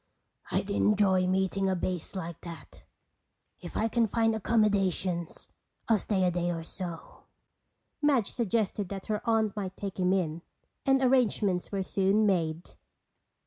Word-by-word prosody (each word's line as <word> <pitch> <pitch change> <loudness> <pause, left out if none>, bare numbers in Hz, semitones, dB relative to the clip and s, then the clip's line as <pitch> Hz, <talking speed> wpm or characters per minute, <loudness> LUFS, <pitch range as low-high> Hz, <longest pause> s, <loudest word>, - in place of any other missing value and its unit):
"I'd 200 - -1
enjoy 195 -3 +3
meeting 190 +1 +1
a 190 - +1
bass 180 0 -3
like 170 -3 -5
that. 165 -4 -11 0.7
If 175 - -7
I 220 - +2
can 230 0 +2
find 225 +1 +2
accommodations 195 -6 0 0.4
I'll 225 -3 +4
stay 190 -2 0
a 180 - +2
day 175 0 -1
or 165 -1 -3
so." 170 0 -8 0.8
Madge 275 -8 +2
suggested 210 -4 -1
that 195 -1 -6
her 210 -1 -2
aunt 220 -2 +2
might 195 -2 -4
take 195 -1 -5
him 180 0 +2
in, 170 -4 0 0.5
and 270 0 +4
arrangements 220 -8 +2
were 195 -1 -1
soon 195 +3 +2
made. 170 -4 0
195 Hz, 145 wpm, -29 LUFS, 180-215 Hz, 0.8 s, I'll